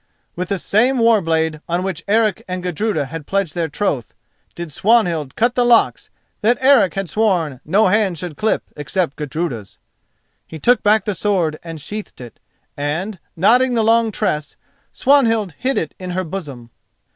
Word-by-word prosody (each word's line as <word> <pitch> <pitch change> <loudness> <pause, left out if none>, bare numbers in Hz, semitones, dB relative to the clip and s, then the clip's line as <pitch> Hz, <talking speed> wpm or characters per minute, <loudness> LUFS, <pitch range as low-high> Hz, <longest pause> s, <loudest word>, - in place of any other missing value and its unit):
With 180 +1 -4
the 200 - 0
same 240 +8 +2
war 230 -3 +4
blade 160 -2 0
on 175 +2 0
which 190 -4 -4
Eric 215 -2 +2
and 185 -1 -4
Gudruda 180 -3 -1
had 150 +2 -8
pledged 195 -5 -1
their 170 -2 -2
troth, 145 - -2 0.4
did 170 -2 -6
Swanhild 175 - +1
cut 240 +2 +2
the 245 - +2
locks 240 -1 +3 0.3
that 235 +3 +3
Eric 260 -8 +4
had 195 -1 -2
sworn 170 - 0
no 200 +8 +3
hand 195 -3 +2
should 170 -1 -6
clip 215 +8 0
except 150 +1 -2
Gudruda's. 150 - -4 0.7
He 160 - -8
took 245 - +3
back 210 -1 +3
the 210 - -1
sword 180 -6 0
and 165 -2 -7
sheathed 210 +8 -7
it, 120 -2 -11 0.4
and, 165 +8 -3 0.2
knotting 245 +8 +3
the 225 - +2
long 225 0 +3
tress, 185 -8 -2 0.4
Swanhild 225 - +2
hid 265 +1 0
it 155 - -2
in 185 -1 -6
her 185 - 0
bosom. 145 -10 -7
185 Hz, 170 wpm, -19 LUFS, 160-220 Hz, 0.7 s, war